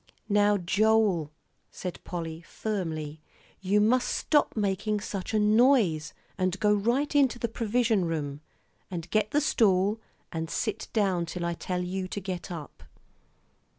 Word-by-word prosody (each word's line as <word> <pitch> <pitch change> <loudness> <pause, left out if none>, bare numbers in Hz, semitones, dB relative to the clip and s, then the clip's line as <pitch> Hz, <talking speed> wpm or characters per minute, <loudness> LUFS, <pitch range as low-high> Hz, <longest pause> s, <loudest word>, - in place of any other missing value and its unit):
"Now, 205 0 +4
Joel," 200 -3 +2 0.4
said 180 -2 -6
Polly, 165 -2 -5
firmly, 160 -7 -4 0.4
"you 195 +2 +2
must 240 +4 +3
just - - -1
stop 295 -6 +2
making 210 +1 0
such 195 -2 -5
a 220 - +1
noise, 210 - +3 0.2
and 185 +1 0
go 210 0 +4
right 240 +9 +1
into 270 -4 +4
the 235 - -1
provision 225 -3 +1
room, 145 -3 -3 0.5
and 175 -2 -5
get 215 -1 +2
the 295 - +2
stool, 210 -5 +2 0.3
and 160 0 -3
sit 215 +5 -2
down 190 -6 +1
till 175 +1 -4
I 170 - 0
tell 180 +1 -3
you 185 +1 -3
to 200 - -4
get 185 -1 -5
up." 160 -5 -8
195 Hz, 150 wpm, -28 LUFS, 175-220 Hz, 0.5 s, Now